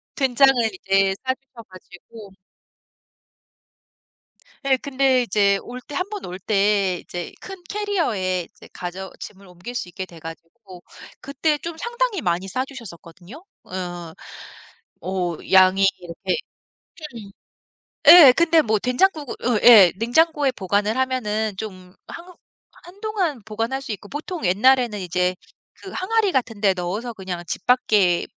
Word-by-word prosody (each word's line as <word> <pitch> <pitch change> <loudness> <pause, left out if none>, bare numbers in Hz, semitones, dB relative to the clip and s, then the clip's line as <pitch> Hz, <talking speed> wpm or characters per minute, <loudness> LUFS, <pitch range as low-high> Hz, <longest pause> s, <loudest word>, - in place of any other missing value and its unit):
된장을 270 0 +4 0.3
이제 195 0 +2
싸 260 - +1
주셔 260 -3 -16
가지고 190 +3 -14 2.4
예. 265 -1 +4
근데 265 -2 +1
이제 200 -3 +2
올 250 +1 -9
때 290 - -12
1 365 +6 -2
번 415 -2 -6
올 180 +1 -7
때 200 -2 +1
이제 175 -1 -7
큰 385 -2 -10
캐리어에 230 - -2
이제 - - -17
가져 185 +1 -7
짐을 200 -1 -11
옮길 180 +7 -10
수 180 - -4
있게 185 +2 -6
돼 170 -3 -15
가지고 170 +4 -12 0.4
그때 295 +2 -1
좀 335 +1 -7
상당히 475 -3 -2
많이 180 +1 -1
싸 255 +7 -2
주셨었거든요. 215 - -12 0.2
어어 175 -3 -7 0.9
뭐 180 -2 -3
양이 190 +1 +6 0.2
이렇게 170 -1 -4 0.8
큰 215 -5 -11 0.8
예 295 -8 +10
근데 335 -1 +4
뭐 220 -1 +1
된장국을 285 - 0
어 235 -4 +2
예 200 -7 +9
냉장고에 285 +4 +2
보관을 205 +1 -1
하면은 220 -6 -1
좀 185 -3 -9
한 350 +1 -11 0.5
한동안 375 - -3
보관할 225 +5 -3
수 230 - -5
있고 205 0 -9
보통 310 - -6
옛날에는 235 +3 +3
이제 180 0 -1 0.4
그 385 - -12
항아리 410 +1 0
같은 230 -5 -2
데 195 -2 +3
넣어서 205 +7 -4
그냥 185 -3 -6
집 - - -5
밖에 210 -8 +2
220 Hz, 255 characters per minute, -22 LUFS, 185-275 Hz, 2.4 s, 예